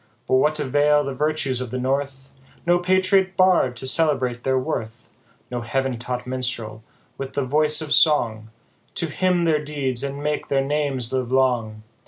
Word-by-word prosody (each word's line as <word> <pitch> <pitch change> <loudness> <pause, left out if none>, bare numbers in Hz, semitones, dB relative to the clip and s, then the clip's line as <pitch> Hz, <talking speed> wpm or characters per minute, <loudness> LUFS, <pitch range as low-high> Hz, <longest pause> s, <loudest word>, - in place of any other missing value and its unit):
But - - -1
what 150 +3 +2
avail 145 +1 +3
the 140 -1 -4
virtues 140 -3 -1
of 125 - -4
the 130 - -4
North, 135 +1 -2 0.3
No 175 +1 +3
Patriot 185 +1 +2
Bard 185 -9 +4
to 130 - -8
celebrate 130 -5 0
their 130 0 +1
worth, 120 -4 -4 0.4
No 120 -1 -3
heav'n 130 +1 -2
taught 125 0 -4
Minstrel, 125 -4 -4 0.4
with 135 -1 -5
the 140 - -1
voice 150 +3 +2
of 155 -2 -1
song, 115 -8 +3 0.5
To 170 - -1
hymn 180 +2 0
their 155 -3 +1
deeds, 135 -4 -3
and 140 +1 -4
make 150 0 -2
their 135 -1 +1
names 140 -4 -1
live 130 -2 -1
long 120 -5 +1
135 Hz, 170 wpm, -22 LUFS, 125-150 Hz, 0.5 s, Bard